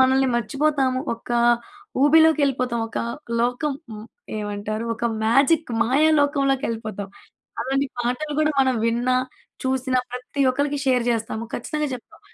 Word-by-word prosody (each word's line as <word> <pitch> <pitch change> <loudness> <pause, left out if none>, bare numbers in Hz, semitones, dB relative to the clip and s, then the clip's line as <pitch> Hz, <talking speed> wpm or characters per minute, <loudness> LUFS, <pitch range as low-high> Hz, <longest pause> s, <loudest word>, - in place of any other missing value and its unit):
మనల్ని 265 0 +4
మర్చిపోతాము. 265 +2 +1
ఒకా 240 +1 -2 0.6
ఊబిలోకెళ్ళిపోతాం. 285 -5 +4
ఒకా - - -3 0.4
లోకం 245 +5 0 0.2
మ్ 210 - -9 0.3
ఏమంటారు? 210 +1 -3
ఒక 230 - -5 0.2
మ్యాజిక్, 275 +6 +3
మాయా 280 +7 +3
లోకంలోకెళ్ళిపోతాం. 265 -8 -1 0.5
అలాంటి 270 +3 0
పాటలు 250 +5 -2
గూడా 310 0 +2
మనం 260 -2 +2
విన్నా, 245 +2 +1 0.5
చూసినా, 260 0 0
ప్రతి 250 +3 -5
ఒక్కళకి 285 +2 -1
షేర్ 250 -2 +3
జేస్తాము. 225 0 -2
ఖచ్చితంగా 300 +4 -2
చెప్తాం. 245 - -13
260 Hz, 115 wpm, -23 LUFS, 235-285 Hz, 0.6 s, మనల్ని